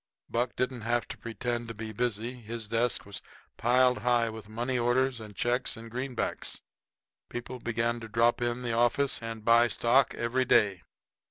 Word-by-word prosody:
Buck 120 Hz, +1 st, 0 dB
didn't 125 Hz, -1 st, -1 dB
have 120 Hz, +2 st, 0 dB
to -, -, -6 dB
pretend 120 Hz, 0 st, -3 dB
to 115 Hz, -, -6 dB
be 110 Hz, 0 st, -6 dB
busy; 120 Hz, +1 st, -1 dB
his 115 Hz, -2 st, -6 dB
desk 115 Hz, +2 st, +1 dB
was 100 Hz, -1 st, -5 dB, 0.3 s
piled 125 Hz, +1 st, +3 dB
high 120 Hz, -2 st, +2 dB
up -, -, -7 dB
with 110 Hz, -1 st, -9 dB
money 120 Hz, +3 st, -1 dB
orders 125 Hz, +1 st, +2 dB
and 105 Hz, -2 st, -10 dB
checks 125 Hz, +2 st, 0 dB
and 115 Hz, 0 st, -10 dB
greenbacks. 125 Hz, 0 st, -2 dB, 0.7 s
People 120 Hz, +1 st, -6 dB
began 115 Hz, 0 st, -1 dB
to 115 Hz, -, -8 dB
drop 115 Hz, +2 st, +2 dB
in 120 Hz, +1 st, -1 dB
the 120 Hz, -2 st, -1 dB
office 120 Hz, +4 st, +2 dB
and 115 Hz, -1 st, -6 dB
buy 115 Hz, +1 st, +6 dB
stock 120 Hz, +3 st, +3 dB
every 120 Hz, +2 st, +1 dB
day. 100 Hz, -6 st, +3 dB
120 Hz, 175 wpm, -29 LUFS, 115-125 Hz, 0.7 s, buy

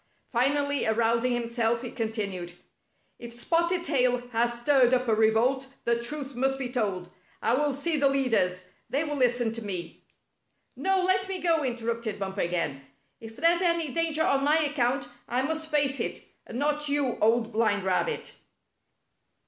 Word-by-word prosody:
Finally 285 Hz, +2 st, +1 dB
arousing 230 Hz, +2 st, +2 dB
himself, 235 Hz, -1 st, 0 dB
he 245 Hz, -, -5 dB
continued: 205 Hz, -7 st, -4 dB, 0.3 s
" -, -, -43 dB
If 235 Hz, 0 st, -9 dB
Spotted 340 Hz, +4 st, +1 dB
Tail 250 Hz, -4 st, +1 dB
has 235 Hz, 0 st, 0 dB
stirred 255 Hz, -1 st, +4 dB
up 250 Hz, 0 st, -1 dB
a 225 Hz, -, +3 dB
revolt, 225 Hz, +5 st, +2 dB, 0.2 s
the 235 Hz, 0 st, +1 dB
truth 275 Hz, +3 st, -4 dB
must 270 Hz, +2 st, 0 dB
be 260 Hz, -2 st, -4 dB
told. 200 Hz, -8 st, -2 dB, 0.3 s
I 230 Hz, -, +1 dB
will 290 Hz, +3 st, +2 dB
see 300 Hz, +4 st, -1 dB
the 280 Hz, -1 st, +3 dB
leaders. 225 Hz, -10 st, +1 dB, 0.2 s
They 280 Hz, +4 st, 0 dB
will 295 Hz, -2 st, -3 dB
listen 245 Hz, -3 st, +1 dB
to 230 Hz, -, -4 dB
me." 180 Hz, -5 st, -5 dB, 0.7 s
"No, 385 Hz, 0 st, +1 dB
let 380 Hz, +1 st, +2 dB
me 380 Hz, -, 0 dB
go!" 330 Hz, -3 st, +2 dB
interrupted 235 Hz, -3 st, -3 dB
Bumper 195 Hz, 0 st, -3 dB
again. 170 Hz, -6 st, -2 dB, 0.4 s
"If 225 Hz, 0 st, -11 dB
there's 335 Hz, +4 st, +3 dB
any 335 Hz, -3 st, +1 dB
danger 320 Hz, -1 st, +2 dB
on 275 Hz, -2 st, +2 dB
my 295 Hz, +2 st, +4 dB
account, 280 Hz, -3 st, 0 dB, 0.2 s
I 250 Hz, +3 st, 0 dB
must 315 Hz, +2 st, -2 dB
face 285 Hz, -3 st, +2 dB
it, -, -, -3 dB, 0.2 s
and 235 Hz, -, -6 dB
not 295 Hz, +1 st, 0 dB
you. 280 Hz, -4 st, 0 dB
Old 225 Hz, +1 st, +2 dB
Blind 215 Hz, -3 st, +1 dB
Rabbit." 190 Hz, -, -1 dB
250 Hz, 165 wpm, -27 LUFS, 225-290 Hz, 0.7 s, stirred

